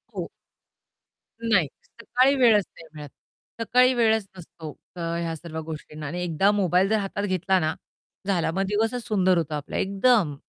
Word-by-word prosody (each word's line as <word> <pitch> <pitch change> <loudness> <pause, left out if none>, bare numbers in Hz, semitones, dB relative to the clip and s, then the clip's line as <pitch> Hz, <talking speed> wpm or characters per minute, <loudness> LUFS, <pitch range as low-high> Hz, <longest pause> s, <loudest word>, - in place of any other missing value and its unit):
हो. - - -3 1.1
नाही 215 -9 +2 0.2
सकाळी 255 +4 +1
वेळच 225 -6 +4
नाही 165 - -13
मिळत. 150 -2 -9 0.5
सकाळी 250 +3 +4
वेळच 220 -3 +2
नसतो 160 -2 -9 0.2
क - - -9 0.2
ह्या 165 -1 -3
सर्व 160 0 -7
गोष्टींना 155 -1 -7
आणि 175 +5 -4
एकदा 180 +4 +2
मोबाईल 190 -2 +2
जर 220 - +3
हातात 200 +1 -3
घेतला 185 -1 +1
ना, 155 -1 0 0.5
झाला, 175 -4 +1
मग 190 +3 -1
दिवसच 225 +4 0
सुंदर 185 -4 +3
होतो 160 -2 -2
आपला 150 -1 -4
एकदम. 195 - +2
190 Hz, 155 wpm, -25 LUFS, 165-220 Hz, 1.1 s, वेळच